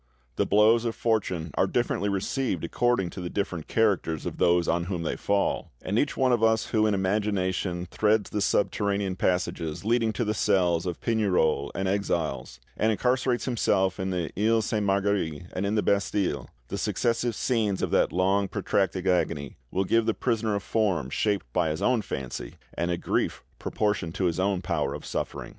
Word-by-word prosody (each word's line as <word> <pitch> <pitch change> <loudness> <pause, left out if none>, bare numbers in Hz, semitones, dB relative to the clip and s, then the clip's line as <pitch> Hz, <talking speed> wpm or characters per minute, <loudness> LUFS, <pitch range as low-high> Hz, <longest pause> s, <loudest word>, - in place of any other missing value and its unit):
The - - +1
blows 110 +3 +5
of 115 -1 -2
fortune 95 -8 -1
are - - +2
differently 100 +3 0
received 100 - -1
according 95 0 +1
to 95 - -7
the 90 - -4
different 90 -5 -3
characters 100 -8 +1
of - - -4
those 85 -1 +3
on 85 0 +1
whom 90 -2 -3
they - - -1
fall; 100 -1 0
and 100 +5 0
each 145 - 0
one 130 -1 +3
of 120 -2 +2
us 110 0 +3
who 110 -1 +3
in 105 - +2
imagination 95 -2 -1
threads 105 +2 +1
the 105 - -1
subterranean 100 -1 0
passages 90 -2 -1
leading 115 0 +2
to 120 - -1
the 105 - 0
cells 90 -4 +2
of 85 - -3
Pignerol 90 -10 +1
and 95 - -1
Exilles, 85 -10 -2 0.2
and 110 - +2
incarcerates 125 +2 +1
himself 95 -6 +1
in 95 0 -1
the 90 -3 -2
Iles 110 +2 +2
Sainte 105 -2 -1
Marguerite 95 -5 0
and 95 +2 -1
in 105 - 0
the 105 - +2
Bastille, 100 -8 0 0.2
the - - -3
successive 115 0 0
scenes 110 -7 0
of - - -1
that - - +3
long 95 +2 +2
protracted 95 -1 -1
agony 85 -6 0
will 95 +7 0
give 115 +3 +2
the 115 - +1
prisoner 110 -3 0
a - - 0
form 95 - 0
shaped 100 -2 0
by 85 -3 +2
his 75 +1 -3
own 125 -3 +3
fancy 65 -9 -6 0.2
and 85 - -2
a 85 - 0
grief - - -1 0.2
proportioned 105 -6 -1
to 95 - 0
his 85 0 0
own 95 -1 0
power - - -1
of - - -8
suffering. - - -4
100 Hz, 185 wpm, -27 LUFS, 90-110 Hz, 0.2 s, blows